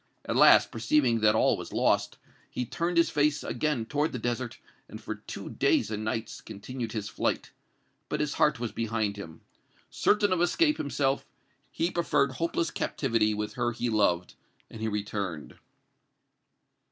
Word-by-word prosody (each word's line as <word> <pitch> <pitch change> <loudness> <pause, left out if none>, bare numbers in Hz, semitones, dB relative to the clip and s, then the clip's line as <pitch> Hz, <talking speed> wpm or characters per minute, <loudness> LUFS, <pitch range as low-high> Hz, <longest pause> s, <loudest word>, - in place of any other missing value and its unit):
At - - -2
last, - - +7
perceiving 115 +1 +2
that 110 0 +4
all - - +4
was - - -8
lost, - - +1 0.3
he 125 - -3
turned 170 +7 -2
his 170 - +4
face 150 0 +1
again 150 -7 -1
toward 150 +5 -1
the - - -2
desert, 120 +1 -3 0.3
and, - - -8
for - - -5
two - - -8
days - - +2
and 110 0 -3
nights, 110 +1 -3
continued 110 +3 -6
his 105 -2 -3
flight. 110 - -2 0.6
But - - -2
his 150 -1 0
heart 150 -5 +2
was 120 -3 -3
behind 110 -2 -1
him. 85 -5 -9 0.5
Certain 205 -2 +2
of 175 - 0
escape 300 - +3
himself, 140 -1 -1 0.4
he 170 +2 -1
preferred 150 -5 +1
hopeless 165 +4 -1
captivity 115 -6 0
with 105 0 -3
her 120 -1 -1
he 120 +1 -2
loved, 90 -5 +1 0.4
and 110 - -9
he 110 - -1
returned." 100 -6 -4
115 Hz, 160 wpm, -28 LUFS, 110-150 Hz, 0.6 s, last